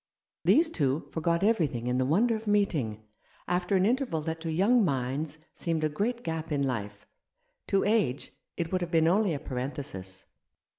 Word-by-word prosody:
These 320 +1 +4
two 145 - 0
forgot 170 +2 -1
everything 160 - +1
in 125 +1 0
the 130 - +1
wonder 225 - +3
of 220 0 -7
meeting, 150 - +1 0.4
after 180 +2 0
an 190 0 +3
interval 245 - +1
that 160 +1 -4
to 165 -1 -3
young 210 +8 +4
minds 140 0 -1 0.2
seemed 165 -2 -2
a 155 - +2
great 230 +10 -2
gap 160 -1 -4
in 140 -1 +1
life. 105 -6 -3 0.6
To 195 -1 +2
age 205 - +1 0.3
it 165 -2 -2
would 185 -1 0
have 175 - -2
been 165 -2 +3
only 190 -1 +3
a - - -4
parenthesis. 125 -9 -5
160 Hz, 170 wpm, -29 LUFS, 135-200 Hz, 0.6 s, These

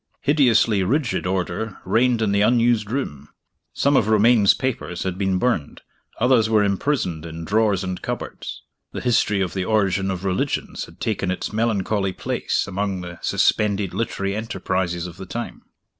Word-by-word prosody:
Hideously 120 -8 +3
rigid 125 -1 0
order 95 +3 -2
reigned 120 -1 +2
in 105 - +1
the 100 0 +2
unused 115 -1 +3
room. 75 - -4 0.4
Some 140 +1 +2
of 110 -5 +3
Romayne's 110 -1 +5
papers 115 -9 -3
had 95 -2 -2
been 95 -1 0
burned; 105 - -1 0.4
others 120 -2 +4
were 110 -2 +4
imprisoned 100 - -1
in 80 0 -7
drawers 105 -2 +2
and 90 -1 -4
cupboards - - -6 0.3
the - - -4
history 105 -5 +2
of 90 -3 -1
the 95 - -1
Origin 100 -3 +1
of 95 0 -4
Religions 95 -1 -2
had - - -17
taken 100 -3 -1
its 95 +3 -3
melancholy 105 -3 0
place - - -1
among 100 -1 -2
the 85 -1 -8
suspended 100 -3 +1
literary 100 -3 -2
enterprises 95 -5 -2
of 90 0 -8
the 95 - -8
time. 120 0 -5
100 Hz, 160 wpm, -22 LUFS, 95-115 Hz, 0.4 s, Romayne's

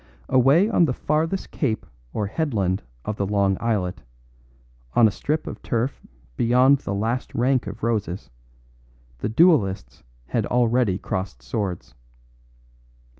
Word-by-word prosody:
Away 135 - +5
on 200 -6 +4
the 130 - 0
farthest 160 +5 -1
cape 115 -7 -1 0.3
or 105 - -2
headland 100 - -1 0.2
of 105 - -3
the 100 - 0
long 100 -1 +2
islet, 105 -6 -1 0.9
on 115 - +7
a - - 0
strip 150 +9 -2
of - - -7
turf 120 +3 -2 0.3
beyond 125 - +4
the 100 - -4
last 115 +5 -2
rank 125 -1 +1
of 100 - -8
roses, 105 -5 -2 0.9
the - - -2
duellists 110 - +2 0.3
had - - 0
already 120 -5 +2
crossed 95 - -4
swords. 95 -9 -4
115 Hz, 125 wpm, -23 LUFS, 100-135 Hz, 0.9 s, on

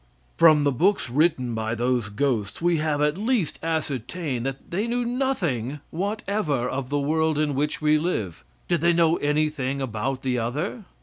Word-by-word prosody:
From 155 -3 +6
the 145 - +3
books 170 -1 +1
written 135 -4 +2
by 110 0 -2
those 120 -2 0
ghosts 105 -2 -1
we 170 0 +2
have 150 -1 0
at 150 +5 +1
least 220 - 0
ascertained 150 -3 -2
that 135 0 -7
they 200 +6 -1
knew 240 +1 0
nothing 175 - -1
whatever 195 - -1
of 130 0 -3
the 145 - 0
world 155 +2 +1
in 150 -1 +1
which 150 +3 -1
we 155 0 +4
live. 110 - -2 0.2
Did 170 -3 +1
they 170 +1 +4
know 165 0 +3
anything 145 -2 0
about 130 +2 -3
any 125 -1 +1
other? 150 - -3
150 Hz, 170 wpm, -25 LUFS, 130-170 Hz, 0.2 s, From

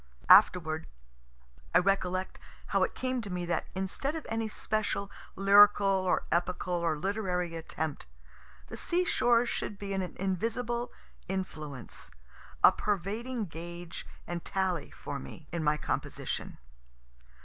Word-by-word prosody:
Afterward, 160 -3 +6 0.9
I - - +10
recollect, 185 0 +1 0.3
how - - +2
it - - +1
came 255 -1 -1
to 200 - -7
me 180 -1 -2
that 170 - -1
instead 195 - -2
of 320 - -5
any 225 0 -1
special 210 -2 -1 0.2
lyrical 200 +1 +7
or 190 -2 +2
epical 180 +1 0
or 170 -3 +1
literary 180 -2 -1
attempt, 160 - -4 0.6
the - - -8
sea 360 +1 +1
shore 240 -7 +3
should 210 -3 -3
be 200 0 -4
an 195 - 0
invisible 225 +7 -2 0.4
influence, 155 - -5 0.5
a - - +10
pervading 215 +5 -2
gauge 170 0 -7 0.2
and 175 -1 -4
tally 185 -5 -1
for - - -6
me, 65 - -10
in 170 -2 -2
my 150 0 +3
composition. - - -3
190 Hz, 125 wpm, -30 LUFS, 170-210 Hz, 0.9 s, I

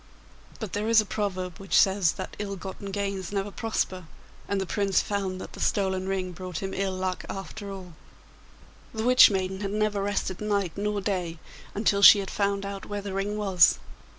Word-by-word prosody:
But 220 -5 -6
there 210 +2 -1
is 230 -1 +6
a 215 - +2
proverb 185 -5 -3
which 195 -1 +2
says 190 -4 +3
that 185 - -7
ill 200 -1 -3
gotten 195 +1 -7
gains 195 -2 -3
never 200 0 -2
prosper, 190 -5 -2 0.4
and 200 - 0
the 190 - -1
Prince 195 0 +1
found 195 -2 -2
that - - -9
the - - -10
stolen 190 -2 0
ring 185 -1 -2
brought 180 0 -6
him 190 +2 -4
ill 195 -1 -1
luck 185 0 -3
after 200 +1 -6
all. 185 -3 -9 1.0
The 220 - -2
Witch 250 +1 +8
maiden 190 -1 -2
had 200 -1 -3
never 210 0 0
rested 200 -2 -2
night 200 -5 -1
nor 205 0 -1
day 180 -4 -2 0.4
until 200 -1 +2
she 200 - +10
had 195 -1 -4
found 200 -1 0
out 200 0 -6
where 205 -1 -4
the 200 -1 -5
ring 200 +2 -2
was. 190 -5 +4
195 Hz, 190 wpm, -27 LUFS, 190-205 Hz, 1.0 s, she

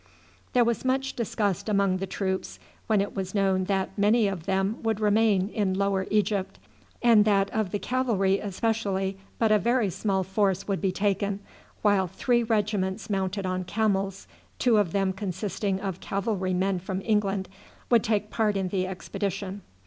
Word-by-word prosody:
There 245 -1 +5
was 235 -2 0
much 265 +1 0
disgust 210 -4 -1
among 200 -2 +2
the 195 +1 -4
troops 190 0 -3 0.3
when 215 -3 +3
it 200 - -4
was 190 0 -4
known 190 -2 +2
that 195 0 -1
many 210 +2 +3
of 185 -3 -4
them 195 +3 0
would 225 -2 0
remain 210 -2 +3
in 200 -4 0
Lower 195 -1 0
Egypt, 205 -2 0 0.5
and 230 -3 +6
that 200 -2 +2
of 215 -3 -1
the 205 - -1
cavalry 205 -6 +1
especially 200 -2 -1 0.2
but 225 -2 +2
a 215 - +5
very 235 -2 +1
small 190 +1 0
force 195 0 0
would 195 -2 -1
be 195 -1 +1
taken, 200 +1 0 0.4
while 200 -3 +3
three 240 +7 +1
regiments 210 -3 -1
mounted 195 0 -1
on 185 0 -1
camels, 195 -1 -1 0.3
two 240 -4 +3
of 200 -5 +2
them 195 0 +1
consisting 195 0 -2
of 190 -2 -4
cavalry 195 -2 -1
men 190 0 +1
from 190 +1 -4
England, 200 -3 +1 0.4
would 235 -3 +5
take 210 -1 0
part 210 -3 +1
in 190 -1 -1
the 185 -1 -1
expedition. 195 +1 -4
200 Hz, 165 wpm, -27 LUFS, 190-215 Hz, 0.5 s, and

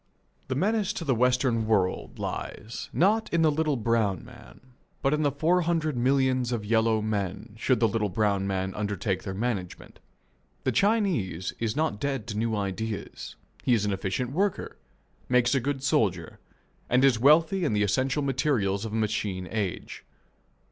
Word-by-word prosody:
The 130 - -2
menace 205 - +1
to 165 - -5
the 135 - +2
Western 125 -2 +2
world 95 -4 0
lies, 110 +2 -5
not 215 +6 +2
in 165 -1 +2
the 155 - +4
little 155 -1 0
brown 110 -5 0
man, - - -14 0.4
but 135 - +2
in 150 - +1
the 145 -2 +2
four 165 +6 +2
hundred 160 -3 0
millions 130 0 +2
of 115 -4 -2
yellow 110 0 +2
men 105 0 -3
should 125 +3 +1
the 115 - +4
little 105 -1 -1
brown 100 -1 0
man 95 -1 -2
undertake 105 -2 -2
their 95 - -5
management. 100 -5 -4 0.6
The - - +1
Chinese 185 - +1
is 115 0 -1
not 155 -9 0
dead 135 -6 -2
to 105 - -4
new 115 0 0
ideas; 105 +2 -4 0.3
he 125 - +4
is 105 -2 0
an 100 - 0
efficient 95 +6 -2
worker; 195 +6 -1 0.5
makes 125 0 +3
a 135 - +3
good 135 +1 -3
soldier, - - 0 0.5
and 125 +2 +4
is 125 -5 +4
wealthy 160 +8 +4
in 145 - +1
the 105 0 +2
essential 130 +8 +1
materials 125 -7 0
of 110 - -5
a - - -1
machine 105 -4 -1
age. 100 -6 -4
115 Hz, 170 wpm, -27 LUFS, 105-140 Hz, 0.6 s, the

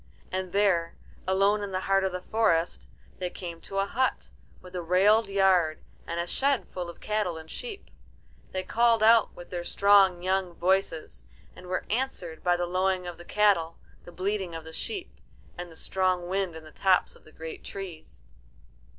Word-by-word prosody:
And 185 -1 -3
there, 190 -4 +2 0.3
alone 195 +2 +3
in 200 -1 -4
the 185 0 -1
heart 195 0 +2
of 190 - 0
the 180 0 -5
forest, 180 -7 +1 0.3
they 180 -1 -1
came 170 -2 -8
to 195 - -7
a 195 - +2
hut, 255 +6 -1 0.3
with 180 0 -13
a 180 - -2
railed 200 +5 +4
yard 185 -5 +3 0.2
and 170 +1 -3
a 170 - 0
shed 275 +8 0
full 180 -2 -5
of 170 - -11
cattle 210 -6 -1
and 160 0 -10
sheep. 455 -5 -7 0.6
They 185 0 -2
called 230 +2 +3
out 225 0 +5
with 175 - -11
their 175 -1 -3
strong 195 -2 +4
young 185 -1 0
voices, 170 - 0 0.3
and 180 - -12
were 185 - -2
answered 210 -9 -3
by 175 0 +3
the 175 - 0
lowing 185 +1 0
of 175 -1 -7
the 175 - -11
cattle, 190 -6 +2 0.3
the - - -11
bleating 185 0 -2
of 165 - -6
the 160 0 -10
sheep, 390 - -5 0.4
and 175 0 -7
the - - -14
strong 185 0 0
wind 190 -2 -1
in 160 - -9
the 155 - -13
tops 190 +1 +2
of - - -20
the 155 - -17
great 160 0 -8
trees. 185 -5 -8
185 Hz, 185 wpm, -28 LUFS, 175-200 Hz, 0.6 s, out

